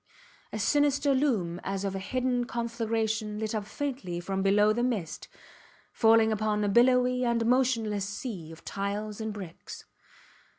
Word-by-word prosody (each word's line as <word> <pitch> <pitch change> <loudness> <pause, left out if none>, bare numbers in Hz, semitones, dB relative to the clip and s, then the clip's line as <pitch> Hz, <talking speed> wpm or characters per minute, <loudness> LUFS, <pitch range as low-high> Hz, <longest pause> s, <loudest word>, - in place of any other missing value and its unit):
A - - -4
sinister 285 +4 +2
loom 215 - 0
as 195 0 -3
of 195 - -2
a 195 - -3
hidden 250 +3 -1
conflagration 225 -2 -2
lit 220 0 -3
up 210 -2 -3
faintly 245 -11 -4
from 190 +2 -2
below 205 +2 +4
the 240 - -1
mist, 220 -10 -2 0.7
falling 225 -1 +5
upon 215 0 0
a 205 - +1
billowy 250 +3 +4
and 235 -1 +1
motionless 230 -5 +1
sea 200 -7 -6
of 165 - -13
tiles 205 +2 -4
and 220 0 -3
bricks. 190 -5 -9
220 Hz, 145 wpm, -28 LUFS, 200-245 Hz, 0.7 s, falling